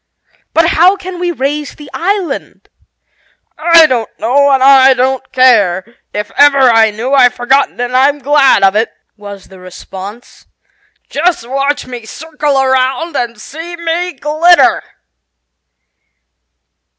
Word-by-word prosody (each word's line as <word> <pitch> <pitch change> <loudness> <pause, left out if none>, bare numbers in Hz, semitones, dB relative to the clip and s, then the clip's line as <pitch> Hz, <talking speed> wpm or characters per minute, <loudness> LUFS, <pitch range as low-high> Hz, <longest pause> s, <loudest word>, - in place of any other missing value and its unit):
"But 330 0 +3
how 355 +4 +3
can 370 -2 -9
we 355 0 -2
raise 290 0 -4
the 295 - -13
island?" 365 -4 -4 0.9
"I 330 +1 +5
don't 240 -6 -2
know 280 +5 +1
and 270 -1 +2
I 265 -1 +5
don't 260 +1 -2
care. 230 -4 +1
If 210 -1 -5
ever 285 -1 +4
I 230 -4 +4
knew 230 +6 -5
I've 250 -3 +4
forgotten, 265 +3 0
and 245 +1 -3
I'm 280 +3 +2
glad 280 -6 +2
of 195 +1 +3
it," 220 +2 0 0.2
was 205 -2 -12
the 190 -1 -15
response. 190 +4 -12 0.6
"Just 320 -5 -1
watch 275 +3 -2
me 245 -3 -10
circle 300 0 -3
around 265 +5 -1
and 235 -4 -4
see 325 +9 -9
me 340 +1 -3
glitter! 320 +4 +2
270 Hz, 130 wpm, -12 LUFS, 235-310 Hz, 0.9 s, I